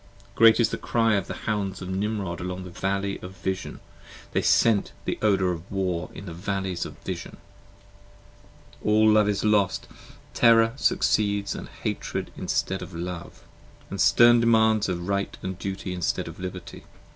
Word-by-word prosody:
Great 115 0 +6
is 115 -2 +4
the - - -4
cry 115 -2 +1
of 100 -3 0
the - - -5
Hounds 100 -3 -2
of 90 - -7
Nimrod 95 -2 -2
along 90 +1 -4
the 90 - -9
Valley 100 +2 -2
Of 90 +1 -10
Vision, 95 0 -4 0.5
they - - +1
scent 110 -4 +3
the - - -2
odor 95 -4 +2
of 85 +2 -7
War 90 -3 -2
in - - -8
the 85 - -7
Valley 95 +2 -3
of 85 - -5
Vision. - - -6 1.4
10 105 - 0
All 110 +1 +5
Love 105 -1 +4
is 100 -1 -1
lost! 105 -3 +2 0.5
terror 115 -1 +5
succeeds 100 -6 +1
& - - -18
Hatred - - -3
instead 95 0 -2
of 90 - -8
Love, 85 0 -6 0.5
And - - -2
stern 120 0 +6
demands 110 -3 +3
of 85 -1 -3
Right 100 0 -1 0.2
& - - -25
Duty 95 -1 -4
instead 90 -2 -1
of - - -9
Liberty. 90 -1 -7
100 Hz, 165 wpm, -25 LUFS, 90-110 Hz, 1.4 s, Great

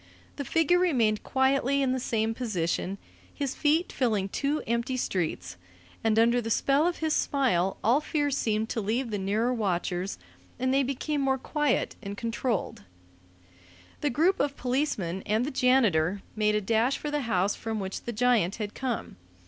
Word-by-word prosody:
The 285 - -4
figure 325 +5 +3
remained 235 -12 +2
quietly 270 +1 +2
in 260 - +1
the 260 - 0
same 225 -2 0
position, 195 -5 -2 0.3
his 280 -2 -3
feet 315 +4 +1
filling 215 -7 0
two 285 +8 -1
empty 235 +3 -1
streets, 155 - -2 0.5
and 220 -1 +2
under 235 +2 +4
the 225 - -4
spell 280 +7 +3
of 350 - -1
his 315 -1 0
smile 210 -10 +1
all 250 +7 +4
fear 295 -2 -1
seemed 220 -5 0
to 225 - -2
leave 230 +4 -1
the 205 - -2
nearer 215 +6 0
watchers, 185 -4 -1 0.4
and 260 +1 0
they 275 - +4
became 275 +2 -2
more 265 -1 +2
quiet 295 +2 0
and 200 0 -6
controlled. 230 -2 -2 1.2
The 295 - 0
group 330 +9 +2
of 280 0 0
policemen 245 - -1
and 220 +3 +1
the 290 - -3
janitor 205 -9 +2
made 210 -1 +2
a 210 - +1
dash 225 +6 +1
for 295 - -4
the 295 0 0
house 200 -5 +1
from 225 -1 -4
which 190 -1 -4
the 240 - -5
giant 230 -5 +2
had 210 -2 -5
come. 250 -3 -4
235 Hz, 170 wpm, -28 LUFS, 210-275 Hz, 1.2 s, under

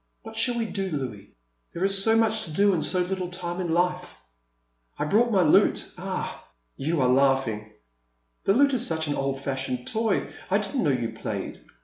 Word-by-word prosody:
What 225 0 -10
shall 235 +2 +1
we 230 - 0
do, 195 -3 -3
Louis 125 - -5 0.2
— - - -46
there 170 - -2
is 195 0 +4
so 225 +1 +4
much 220 -1 +2
to 160 - -8
do 200 +5 +3
and 160 -4 0
so 180 +4 +2
little 180 0 -2
time 175 0 -4
in 175 -2 -2
life! 180 +1 0 0.4
— - - -45
I - - -1
brought 230 +9 +3
my 190 -4 +4
lute 150 - +3
— - - -27
ah! - - -4 0.3
you 155 +4 -1
are 125 - +3
laughing! 125 -5 +1 0.7
The 195 - +4
lute 280 +2 +4
is 245 -2 +2
such 160 -6 -1
an 145 - -1
old 135 -1 -2
fashioned 130 -2 -3
toy; 220 -2 0 0.2
I 195 - +3
didn't 210 +6 -2
know 155 - +2
you 125 -4 0
played. - - -5
175 Hz, 210 wpm, -26 LUFS, 135-200 Hz, 0.7 s, is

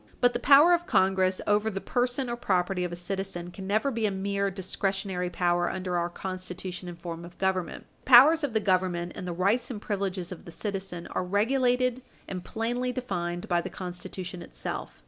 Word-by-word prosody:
But 245 -1 +4
the 240 - -1
power 290 +7 +7
of 345 0 +1
Congress 190 0 +2
over 210 +1 +2
the 195 -2 -3
person 245 +4 0
or 240 - -2
property 185 -4 0
of 175 - -3
a - - -4
citizen 175 -1 -4
can 190 +1 -8
never 215 +7 +1
be 225 -3 0
a - - +1
mere 200 +1 -1
discretionary 190 -1 -2
power 175 0 +1
under 185 -1 -3
our 175 0 0
Constitution 185 0 -6
and 170 -1 -9
form 170 -1 -6
of 175 0 -12
Government. 190 -3 -1
The - - -14
powers 290 +6 +8
of 280 -6 -1
the 220 - +3
Government 185 -3 +1
and 180 - -6
the - - -2
rights 200 +8 +1
and 235 -5 -5
privileges 195 -4 -3
of 180 - -8
the 170 - -9
citizen 190 -1 -5
are - - -1
regulated 250 +5 +2 0.3
and 185 -2 -5
plainly 245 +3 -2
defined 175 -9 -3
by 175 -1 +2
the - - -5
Constitution 180 0 -6
itself. 115 - -6
190 Hz, 195 wpm, -28 LUFS, 180-225 Hz, 0.3 s, powers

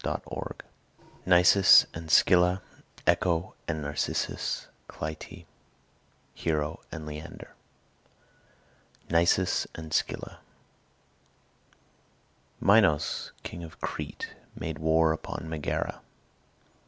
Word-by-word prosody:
CHAPTER - - -3
XIII - - -6 0.6
NISUS 90 +2 +7
AND 80 0 -8
SCYLLA 90 +2 +4 0.4
ECHO 85 0 +1
AND 80 -3 -2
NARCISSUS 75 +1 -2 0.2
CLYTIE 80 0 -7 0.9
HERO 75 -1 -2
AND 80 -1 -6
LEANDER 75 +2 -9 1.6
NISUS 85 +2 +2
AND 80 -1 -8
SCYLLA - - -2 2.2
Minos, 95 -8 +3
king 85 - -7
of 80 - -11
Crete, - - -5 0.3
made 80 0 -5
war 80 0 +3
upon 80 0 -6
Megara. 80 -2 -3
80 Hz, 80 wpm, -28 LUFS, 80-90 Hz, 2.2 s, NISUS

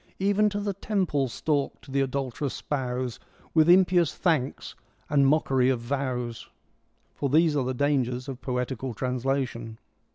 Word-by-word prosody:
Even 205 +2 +3
to 205 0 -3
the 200 -1 -2
temple 185 -9 0
stalked 140 +2 -2
the 140 +1 +1
adulterous 135 0 -2
spouse 125 -3 -3 0.3
With 160 0 +5
impious 180 -2 +5
thanks 155 -7 -1 0.4
and 140 -2 +4
mockery 135 -3 +3
of 130 -2 +1
vows. 125 -2 -3 0.6
For 140 - -2
these 155 +2 +4
are 135 -3 +1
the 130 0 -2
dangers 130 -2 0
of 135 -2 -6
poetical 125 -1 -3
translation. 125 -2 -2
135 Hz, 135 wpm, -27 LUFS, 125-155 Hz, 0.6 s, With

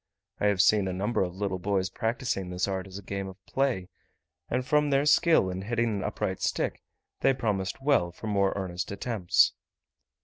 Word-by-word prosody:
I 105 - +2
have 100 -2 +4
seen 105 -3 +4
a 95 - -2
number 105 +5 0
of 90 -1 -2
little 95 -1 -2
boys 95 0 0
practising 110 -4 -2
this 90 +1 -1
art 95 -1 -3
as 95 0 -8
a 100 - -9
game 100 0 -4
of 95 -1 -9
play 130 -9 0 0.6
and 125 +1 -1
from 150 +1 +2
their 140 +1 +2
skill 150 - +4
in 90 +1 -4
hitting 115 +3 0
an 95 - -3
upright - - -2
stick, - - -1 0.4
they 135 - +3
promised 105 0 -2
well 115 -12 +3
for 90 - -11
more 100 -2 +2
earnest 90 -2 -4
attempts. 100 -3 +2
100 Hz, 190 wpm, -28 LUFS, 95-120 Hz, 0.6 s, have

